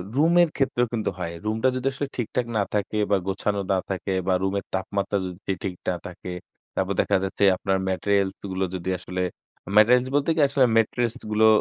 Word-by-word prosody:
Room 160 +5 +4
এর 170 - +4
ক্ষেত্রেও 125 -3 +1
কিন্তু 110 -2 0
হয়। 85 -2 -4
রুমটা 110 +3 +1
যদি 130 +1 -1
আসলে 140 +2 -3
ঠিকঠাক 120 +1 -1
না 105 - +3
থাকে 105 +1 -1
বা 100 - +5
গোছানো 100 +1 -1
না 95 - +3
থাকে 95 0 -2
বা 95 - +3
রুমের 95 +1 -1
তাপমাত্রা 100 +1 -1
যদি 95 +2 -4
ঠিক 95 -2 -3
না 90 - 0
থাকে। 90 0 -7 0.4
তারপর 95 +1 0
দেখা 100 - +2
যাচ্ছে 95 +1 -2
আপনার 95 +1 0
materials 100 +1 +1 0.2
গুলো 95 +1 0
যদি 90 0 -4
আসলে 90 0 -4 0.6
materials 125 +4 +6
বলতে 145 +2 +2
কি? - - -1
আসলে 135 -1 +3
মেট্রেস 115 +1 +1 0.2
গুলো 110 +1 +5
100 Hz, 185 wpm, -25 LUFS, 95-120 Hz, 0.6 s, materials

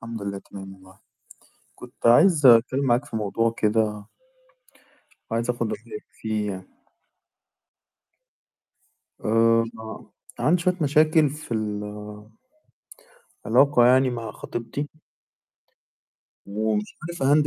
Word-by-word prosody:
الحمد 115 -2 -7
لله 100 -1 -4
تمام 95 0 -11
والله، 95 0 -19 0.8
كنت - - -12
عايز 150 +6 +5
أتكلم 125 +3 +5
معاك 125 +2 +2
في 145 - -8
موضوع 115 +2 0
كده. 105 -1 0 1.3
عايز 115 +2 -1
آخُد 120 -2 -2
رأيك 115 -2 -8
فيه 110 -2 -3
يعني. 95 -1 -11 2.4
آآ 115 +1 +3
ما 110 -1 -10 0.3
عندي 175 +3 +2
شوية 180 +1 +1
مشاكل 155 +1 +3
في 150 -4 -7
ال 105 -2 -3 1.6
علاقة 140 -4 +5
يعني 130 +1 +4
مع 115 -2 -5
خطيبتي؟ 120 +5 -5 1.6
ومش 105 +1 -2
عارف 170 -2 -6
أhandle 145 +2 +4
115 Hz, 105 wpm, -24 LUFS, 105-140 Hz, 2.4 s, عايز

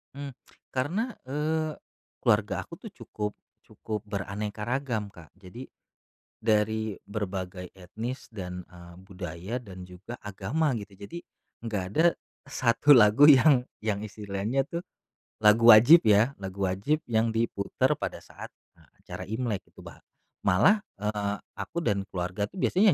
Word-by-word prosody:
Mmm. 140 -2 -7 0.4
Karena, 185 - -1 0.2
eee, 155 +2 -1 0.5
keluarga - - +1
aku - - -15
tuh - - -9
cukup 105 -1 -5 0.3
cukup 105 -2 -6
beraneka 105 +1 -4
ragam, 120 -5 -2
Kak. 85 -2 -14
Jadi 100 +7 -11 0.7
dari 110 -1 +1
berbagai 95 -3 -5
etnis 110 +8 -6
dan, 90 -3 -6
eee, 85 -1 -14
budaya 95 +2 -7
dan 95 -4 -10
juga 90 +7 -10
agama 125 +10 -1
gitu, 100 -3 -7
jadi 170 +13 -8 0.4
nggak 105 -5 -3
ada 160 - +3 0.4
1 130 +2 +5
lagu 120 +7 +7
yang 135 -1 +7 0.2
yang 105 -1 0
istilahnya 105 +5 -2
tuh, 170 +3 -5 0.6
lagu 110 +2 +8
wajib 120 +8 +8
ya, 110 +6 +4
lagu 95 0 -7
wajib 140 +12 0
yang 110 0 +1
diputar 115 -3 0
pada - - -5
saat, - - -11 0.2
eee, - - -23
acara 90 +1 -7
Imlek 110 -1 -3
itu - - -14
bah - - -12 0.5
malah, 195 - +4 0.2
eee, 105 -1 -1 0.2
aku 170 - -4
dan 100 -8 0
keluarga 90 +3 -2
tuh 190 - -13
biasanya 195 -1 +4
105 Hz, 135 wpm, -27 LUFS, 100-130 Hz, 0.7 s, lagu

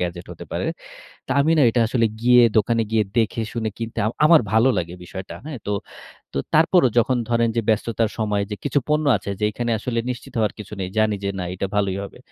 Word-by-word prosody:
Gadget 85 0 -4
হতে - - -10
পারে। - - -2 0.6
তো - - -11
আমি 150 +3 +2
না - - +5
এটা 120 - +1
আসলে 115 -1 +2
গিয়ে 125 +1 +6
দোকানে 115 +2 +3
গিয়ে, 110 -1 +3 0.2
দেখে 115 0 +1
শুনে 115 -2 -2
কিনতে 115 -1 -5
আম 110 - -1
আমার 160 0 +7
ভালো 110 +4 +5
লাগে 85 0 -4
বিষয়টা, 95 +2 -8
হ্যাঁ 150 -4 -6
তো। 105 - -1 0.6
তো - - -2 0.2
তারপরও 160 -2 +5
যখন 125 +2 +3
ধরেন 115 -1 +2
যে, 115 - +2
ব্যস্ততার 110 +1 +1
সময় 105 -2 0
যে, 105 - -3
কিছু 145 - +1
পণ্য 150 0 +2
আছে - - -8
যে, - - -3
এখানে 120 +2 -2
আসলে 115 +1 -2
নিশ্চিত 125 - -9
হওয়ার 110 -2 +1
কিছু 105 0 -9
নেই। 95 -1 -3
জানি 110 -1 +3
যে 100 - 0
না, 90 - -2
এটা 95 +1 -3
ভালোই 100 -2 0
হবে। 100 - -10
115 Hz, 220 wpm, -22 LUFS, 105-120 Hz, 0.6 s, আমার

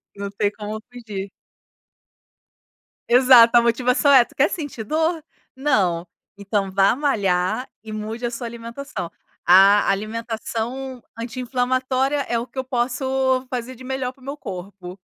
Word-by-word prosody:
Não 200 0 -5
tem 205 0 0
como 215 +1 -6
fugir. 210 -5 -7 1.8
Exato, 245 -1 +7
a - - +7
motivação 250 +4 +2
é: 260 -3 +7
"Tu - - -22
quer 290 +4 +3
sentir 290 -8 -5
dor? 320 +6 0 0.3
Não. 190 -11 +1 0.3
Então 200 -1 -2
vá 195 +4 +3
malhar 205 -5 0
e 220 - -9
mude 220 +3 -5
a 240 - -2
sua 240 0 -5
alimentação". 235 - -7 0.3
A 195 +3 +6
alimentação 230 +4 -4
anti-inflamatória 255 +3 -1
é 235 - 0
o 235 - -5
que 265 - -20
eu 260 - -1
posso 260 +1 0
fazer 250 0 -5
de 255 - -13
melhor 260 -1 -3
para 265 - -26
o - - -17
meu 280 +1 -4
corpo. 190 -5 -8
240 Hz, 145 wpm, -22 LUFS, 210-260 Hz, 1.8 s, Exato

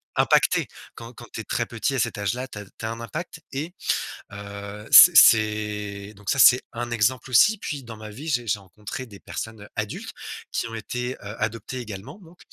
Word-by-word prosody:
impactée. - - +3 0.3
Quand 115 +1 -10
quand 120 - -11
tu 110 - -4
es - - -9
très 115 - -1
petit, 120 +5 -2
à - - 0
cet 110 - -1
âge-là, 120 +6 -2
tu 105 - -9
as 105 - -9
tu 110 - -10
as 110 - -2
un 115 - -6
impact 165 +6 -6
et 155 +6 -4 0.6
heu, 100 +1 -8
c'est 175 -2 +10
c'est 105 -3 +4
donc 100 -1 -5
ça, 140 - 0
c'est 125 +1 +7
un 120 0 -4
exemple 120 +3 0
aussi. 210 - +6
Puis, 145 -7 -5
dans 115 -2 -9
ma 110 0 -9
vie, 140 +10 -8
j'ai 120 -5 0
j'ai 105 -1 0
rencontré 105 +6 -8
des 100 -3 -13
personnes 110 -2 -7
adultes 110 -1 -4 0.4
qui 115 - -2
ont 115 - -8
été, 125 +3 -4
heu, 105 0 -9
adoptées 115 +4 -3
également 110 - -8
donc 170 +1 -17
115 Hz, 205 wpm, -24 LUFS, 105-130 Hz, 0.6 s, c'est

